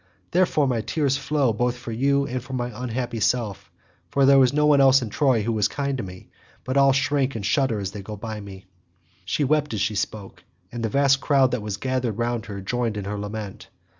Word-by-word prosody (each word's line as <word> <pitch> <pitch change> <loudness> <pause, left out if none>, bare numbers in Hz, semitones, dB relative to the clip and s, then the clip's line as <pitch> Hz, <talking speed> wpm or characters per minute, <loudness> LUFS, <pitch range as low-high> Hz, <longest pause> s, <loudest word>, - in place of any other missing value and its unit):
Therefore 170 -5 +2
my 120 -3 0
tears 140 +3 0
flow 140 -3 0
both 120 +3 -1
for 120 -1 -7
you 140 +4 +1
and 130 -1 -3
for 130 - -9
my 125 -1 -2
unhappy 120 0 -4
self, 110 -3 -1 0.4
for 140 -1 +3
there 135 0 +6
is 125 - +3
no 150 +1 +2
one 145 -2 +5
else 135 -1 +5
in 115 - -5
Troy 130 -6 +2
who 115 +1 -1
is 105 - +3
kind 140 +3 -2
to - - -3
me, 90 -1 -10 0.3
but 130 - -3
all 140 0 +5
shrink 135 0 +1
and 105 -3 -4
shudder 130 -2 +1
as 95 -1 -4
they 105 - -7
go 105 +2 -8
by 110 +1 -6
me." 95 -2 -11 0.6
She 145 - 0
wept 150 -2 +1
as 100 - -2
she 105 - 0
spoke 100 0 -5 0.3
and 120 -1 -5
the 110 - 0
vast 140 +2 +3
crowd 135 -3 +3
that 125 -2 -1
was 105 -1 -4
gathered 125 -2 -2
round 120 -1 -2
her 100 -1 -6
joined 115 +2 -2
in 100 - -4
her 105 +1 -4
lament. 105 -1 -7
125 Hz, 225 wpm, -24 LUFS, 105-135 Hz, 0.6 s, there